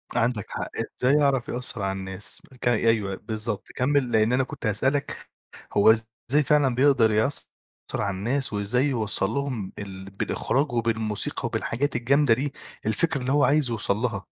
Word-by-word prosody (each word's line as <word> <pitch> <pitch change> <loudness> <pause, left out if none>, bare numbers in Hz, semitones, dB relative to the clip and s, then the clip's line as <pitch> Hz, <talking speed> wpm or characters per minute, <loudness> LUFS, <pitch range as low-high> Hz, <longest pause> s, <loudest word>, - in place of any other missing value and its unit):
عندك 115 -3 +1
حق، - - -4 0.3
إزاي 130 +2 +3
يعرف 140 -4 +2
يأثّر 125 -2 -3
على 95 0 0
الناس 95 0 -6 0.2
ك - - -1
أيوه 110 -4 +2
بالضبط، 110 -1 -4
كمّل، 130 -1 +1
لإن 110 +1 +3
أنا 130 +1 +3
كنت 125 - -8
هاسألك 135 +7 0 0.6
هو 100 +2 +6
إزاي 115 +6 0
فعلًا 140 -2 +3
بيقدر 130 -4 +4
يأثّر 110 +7 +1 0.5
على 100 -2 -1
الناس 125 +5 -1
وإزاي 105 +7 +1
يوصّل 110 -7 0
لهم 125 -6 -3
ال 95 -1 -8
بالإخراج 135 +8 -1
وبالموسيقى 110 -3 -1
وبالحاجات 145 +5 -1
الجامدة 130 +2 +3
دي، 135 +4 -2 0.3
الفكرة 135 +7 0
اللي 125 +1 -1
هو 145 +1 +4
عايز 140 0 +3
يوصل 110 -3 0
لها؟ 110 -4 -2
120 Hz, 155 wpm, -25 LUFS, 105-135 Hz, 0.6 s, هو